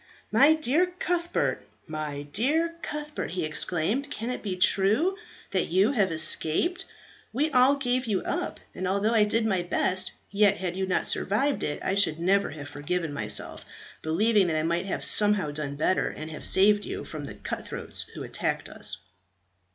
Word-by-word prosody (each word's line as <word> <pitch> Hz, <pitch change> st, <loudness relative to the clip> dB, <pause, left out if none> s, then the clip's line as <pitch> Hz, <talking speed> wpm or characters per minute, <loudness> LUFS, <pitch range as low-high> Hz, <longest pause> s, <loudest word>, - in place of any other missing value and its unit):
"My 305 Hz, +3 st, +6 dB
dear 310 Hz, +4 st, +2 dB
Cuthbert, 345 Hz, -1 st, -1 dB, 0.2 s
my 155 Hz, -2 st, -5 dB
dear 290 Hz, -, 0 dB
Cuthbert!" 300 Hz, 0 st, -5 dB
he 180 Hz, -3 st, -2 dB
exclaimed. 180 Hz, -, -1 dB
"Can 235 Hz, -4 st, -4 dB
it 250 Hz, -, -5 dB
be 195 Hz, -3 st, -3 dB
true 210 Hz, -, +3 dB, 0.4 s
that 185 Hz, -, 0 dB
you 190 Hz, +8 st, +3 dB
have 205 Hz, -9 st, +1 dB
escaped? 160 Hz, -, +1 dB, 0.5 s
We 295 Hz, +7 st, 0 dB
all 260 Hz, +1 st, +5 dB
gave 255 Hz, -2 st, -1 dB
you 200 Hz, -4 st, -1 dB
up; -, -, -3 dB
and 185 Hz, -, -4 dB
although 200 Hz, +4 st, +1 dB
I 215 Hz, -2 st, +4 dB
did 220 Hz, +2 st, +1 dB
my 190 Hz, -5 st, +1 dB
best, 185 Hz, +1 st, +1 dB, 0.2 s
yet 205 Hz, 0 st, +3 dB
had 180 Hz, -1 st, -3 dB
you 190 Hz, 0 st, -2 dB
not 185 Hz, -, +1 dB
survived 270 Hz, +9 st, +1 dB
it 145 Hz, -, -3 dB
I -, -, 0 dB
should 180 Hz, -6 st, +3 dB
never 195 Hz, +3 st, +2 dB
have 145 Hz, -1 st, -8 dB
forgiven 145 Hz, +2 st, -3 dB
myself, 105 Hz, -6 st, 0 dB, 0.4 s
believing 200 Hz, +5 st, +2 dB
that 160 Hz, -, -1 dB
I 155 Hz, -, 0 dB
might 170 Hz, +3 st, -1 dB
have -, -, -2 dB
somehow 205 Hz, -7 st, +3 dB
done 145 Hz, -1 st, -4 dB
better, 160 Hz, +5 st, +1 dB
and 155 Hz, +1 st, -8 dB
have 155 Hz, -, -2 dB
saved 205 Hz, +2 st, +4 dB
you -, -, -5 dB
from 150 Hz, -2 st, -7 dB
the -, -, -8 dB
cut -, -, -6 dB
throats -, -, -4 dB
who -, -, -6 dB
attacked -, -, -3 dB
us." -, -, +1 dB
195 Hz, 175 wpm, -26 LUFS, 160-245 Hz, 0.5 s, My